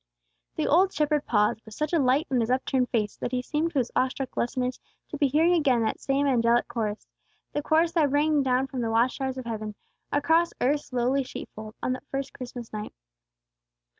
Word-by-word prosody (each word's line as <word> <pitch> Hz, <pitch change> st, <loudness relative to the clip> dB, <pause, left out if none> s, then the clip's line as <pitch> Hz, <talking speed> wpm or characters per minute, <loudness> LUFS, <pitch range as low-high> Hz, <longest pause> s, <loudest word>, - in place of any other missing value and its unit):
The -, -, -1 dB
old 370 Hz, +5 st, +4 dB
shepherd 300 Hz, -2 st, 0 dB
paused, 210 Hz, 0 st, +2 dB
with 220 Hz, -2 st, -12 dB
such 305 Hz, +2 st, -2 dB
a 335 Hz, -, +4 dB
light 270 Hz, +3 st, +3 dB
on 255 Hz, -, +2 dB
his 225 Hz, 0 st, 0 dB
upturned 255 Hz, 0 st, +1 dB
face 210 Hz, -3 st, -1 dB
that -, -, -4 dB
he 250 Hz, -1 st, -1 dB
seemed 310 Hz, +5 st, -1 dB
to -, -, -2 dB
his 245 Hz, -3 st, 0 dB
awestruck 260 Hz, 0 st, -1 dB
listeners 250 Hz, +1 st, -1 dB, 0.3 s
to 295 Hz, -, -5 dB
be 285 Hz, -, +4 dB
hearing 320 Hz, +6 st, +3 dB
again 270 Hz, -9 st, +3 dB
that 220 Hz, -, -1 dB
same 275 Hz, +1 st, 0 dB
angelic 240 Hz, -3 st, +3 dB
chorus, 215 Hz, -3 st, -3 dB, 0.5 s
the 295 Hz, -, 0 dB
chorus 320 Hz, +3 st, +2 dB
that 320 Hz, -4 st, +2 dB
rang 295 Hz, +1 st, +3 dB
down 260 Hz, 0 st, +2 dB
from 265 Hz, -2 st, -4 dB
the 230 Hz, -, -1 dB
watch 230 Hz, +4 st, +2 dB
towers 265 Hz, -1 st, -2 dB
of 260 Hz, -, -6 dB
heaven, 215 Hz, -2 st, -4 dB, 0.4 s
across 320 Hz, +4 st, +2 dB
earth's 285 Hz, +3 st, 0 dB
lowly 255 Hz, +2 st, +1 dB
sheep 255 Hz, -, -8 dB
fold, 215 Hz, 0 st, -9 dB
on -, -, 0 dB
that 260 Hz, +2 st, -8 dB
first 270 Hz, 0 st, -4 dB
Christmas 245 Hz, -3 st, -8 dB
night. 210 Hz, 0 st, -6 dB
260 Hz, 205 wpm, -27 LUFS, 240-295 Hz, 0.5 s, old